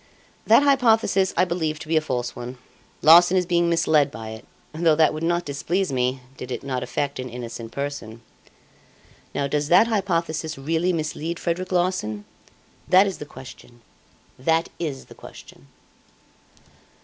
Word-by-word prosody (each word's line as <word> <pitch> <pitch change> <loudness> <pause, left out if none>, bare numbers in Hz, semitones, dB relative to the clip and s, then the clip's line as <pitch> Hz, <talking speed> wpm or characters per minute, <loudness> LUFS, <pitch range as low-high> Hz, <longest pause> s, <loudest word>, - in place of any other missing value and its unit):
That - - +6
hypothesis 225 -8 +3
I 180 - +4
believe 165 -3 -2
to 155 0 -10
be 160 - 0
a 155 - +4
false 125 -5 -3
one. 125 +1 -7 0.5
Larsan 175 +4 +7
is 180 - +1
being 170 -1 +1
misled 155 -4 +3
by 110 -5 -8
it, 110 +1 -9 0.3
though 160 0 +3
that 155 0 +3
would 155 - -5
not 175 +1 0
displease 155 +4 -2
me, 130 +1 0 0.2
did 125 - -8
it - - -4
not 130 -2 -3
affect 135 +3 -3
an 130 0 -5
innocent 115 -1 -7
person. 140 -5 -6 1.1
Now 140 - 0
does 145 +1 -1
that 180 +7 +6
hypothesis 170 -8 -1
really 165 +6 0
mislead 165 0 -3
Frederic 180 +2 -3
Larsan? 175 - -1 0.6
That 185 +2 +6
is 195 -2 -4
the 150 - -8
question 125 -3 -13 0.6
that 160 +5 +1
is 150 -6 -4
the - - -14
question." 70 - -14
155 Hz, 155 wpm, -23 LUFS, 130-175 Hz, 1.1 s, Larsan